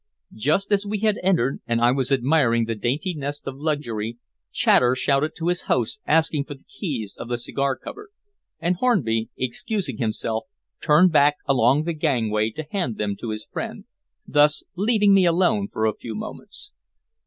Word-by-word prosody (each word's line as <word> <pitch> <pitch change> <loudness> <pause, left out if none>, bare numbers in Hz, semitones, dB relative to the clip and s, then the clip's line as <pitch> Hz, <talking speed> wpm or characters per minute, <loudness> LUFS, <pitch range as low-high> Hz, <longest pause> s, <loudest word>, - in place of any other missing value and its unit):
Just 155 - 0
as 200 0 +3
we 210 +1 -2
had 215 -2 +2
entered, 175 -9 +1
and 115 0 +1
I 120 +1 +4
was 135 0 -1
admiring 130 -3 +3
the 115 - -2
dainty 130 - -2
nest 145 -1 -5
of 135 0 -6
luxury, 120 -8 -2 0.3
Chater 125 0 +4
shouted 140 +4 0
to 170 0 -2
his 180 0 0
host 125 - 0
asking 155 -2 +2
for 145 - -8
the 135 - -21
keys 125 - -5
of - - -8
the 120 - -1
cigar 135 +3 -1
cupboard, 420 0 -10 0.5
and 175 +2 0
Hornby, 120 - +1
excusing 135 - -2
himself, 110 0 -2 0.4
turned 165 +4 +5
back 145 -1 +5
along 135 +2 +3
the 170 +1 -2
gangway 115 -9 0
to 155 +8 -6
hand 135 - -2
them 105 -1 -2
to 115 - -6
his 110 0 -5
friend, - - -6 0.4
thus 150 +1 +3
leaving 205 +1 +3
me 190 -2 +5
alone 170 - +2
for 110 - -1
a 110 - +2
few 110 +1 -8
moments. 210 - -8
140 Hz, 175 wpm, -23 LUFS, 115-170 Hz, 0.5 s, turned